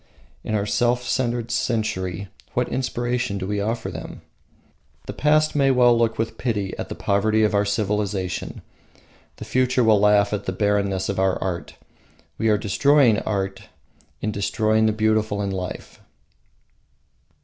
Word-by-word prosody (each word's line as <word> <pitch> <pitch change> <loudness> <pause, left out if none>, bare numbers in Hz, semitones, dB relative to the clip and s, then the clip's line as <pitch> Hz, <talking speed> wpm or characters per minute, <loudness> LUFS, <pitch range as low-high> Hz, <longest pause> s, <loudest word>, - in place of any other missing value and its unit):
In 110 - -2
our 100 -1 0
self 120 +3 +1
centered 120 -2 -1
century, 105 -6 -2 0.3
what - - +1
inspiration 125 -3 -2
do 95 - -4
we 105 +1 -2
offer 115 +3 -2
them? - - -8 0.8
The - - -6
past 155 +1 +2
may 140 -2 +3
well 125 -2 +5
look 115 -1 +1
with 115 0 -3
pity 105 -6 -2
at - - -5
the - - -5
poverty 110 +2 +1
of 105 - +2
our 100 0 +2
civilisation; 100 -3 -2 0.7
the - - -9
future 130 0 +1
will 110 -2 +5
laugh 105 0 +4
at 105 - -3
the 95 - -2
barrenness 100 -1 0
of 100 -1 -2
our 95 -1 +2
art. 90 -3 -4 0.6
We 110 0 +2
are 105 - +4
destroying 115 +3 +3
the 110 +2 -2
beautiful 110 -1 +1
in 100 -1 -2
life. 90 -1 -6
110 Hz, 140 wpm, -23 LUFS, 100-120 Hz, 0.8 s, well